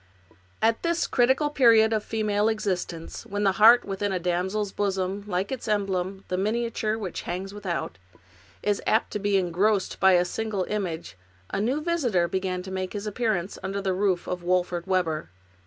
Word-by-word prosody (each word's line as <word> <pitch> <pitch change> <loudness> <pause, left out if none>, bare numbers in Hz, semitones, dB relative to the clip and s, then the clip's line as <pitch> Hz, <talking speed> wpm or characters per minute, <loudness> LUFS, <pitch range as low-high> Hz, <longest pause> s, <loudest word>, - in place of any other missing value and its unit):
At 225 0 +3
this 340 0 +1
critical 265 +4 +2
period 225 -5 +5
of 215 -1 0
female 215 -1 0
existence, 185 -6 -3
when 205 -2 -3
the 195 - +4
heart 235 +3 +8
within 200 0 -2
a 190 - 0
damsel's 185 +4 -1
bosom, 195 0 -1
like 190 +2 -2
its 260 -3 -4
emblem, 195 -2 -1
the 185 - -2
miniature 220 +1 -1
which 195 -6 -5
hangs 190 +3 -4
without, 185 - -4 0.6
is 205 -1 +1
apt 220 - +2
to 210 - -2
be 205 0 +2
engrossed 190 +3 +1
by 190 -1 +6
a 175 0 +4
single 215 0 -2
image, 170 - -4 0.3
a 200 - -1
new 260 +8 0
visitor 260 - +1
began 185 0 -2
to 190 - -8
make 185 -1 -3
his 205 0 -4
appearance 210 -4 -1
under 195 +1 -3
the 195 -1 -1
roof 185 -2 0
of 180 -1 -3
Wolfert 175 0 0
Webber. 175 -5 0
200 Hz, 170 wpm, -26 LUFS, 185-220 Hz, 0.6 s, heart